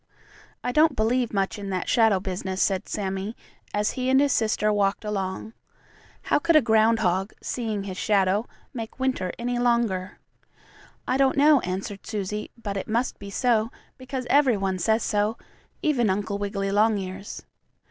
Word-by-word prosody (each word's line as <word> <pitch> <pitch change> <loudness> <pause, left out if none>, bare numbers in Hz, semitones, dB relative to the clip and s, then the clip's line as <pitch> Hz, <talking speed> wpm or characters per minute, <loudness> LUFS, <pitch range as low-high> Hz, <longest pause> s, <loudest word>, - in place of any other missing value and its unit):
"I 250 - -1
don't 310 +4 +4
believe 235 +2 +1
much 195 0 -1
in 200 -1 -5
that 185 -2 -2
shadow 225 -5 +4
business," 190 0 -4
said 190 -2 0
Sammie, 195 +1 -3 0.4
as 210 0 0
he 255 -1 -2
and 265 0 +5
his 285 0 +3
sister 215 -2 +1
walked 200 +1 0
along. 200 +1 -3 0.7
"How - - +2
could 335 +2 +2
a 310 - +8
groundhog, 220 -4 +2
seeing 220 -5 -3
his 190 -2 -6
shadow, 200 +2 +2 0.3
make 230 +1 -7
winter 260 -9 0
any 245 +1 -2
longer?" 235 -6 0 0.9
"I 255 - +1
don't 270 -1 +3
know," 295 0 +6
answered 195 +1 -5
Susie, 210 0 -3
"but 205 -4 -4
it 195 - -4
must 235 +3 -1
be 200 - -8
so, 225 +1 +1 0.3
because 255 0 -5
every 275 -6 +4
one 190 -1 -1
says 220 +6 +2
so; 210 +1 0 0.5
even 255 -9 +2
Uncle 200 +1 -1
Wiggily 200 -1 -2
Longears." 200 -2 0
215 Hz, 160 wpm, -25 LUFS, 195-240 Hz, 0.9 s, a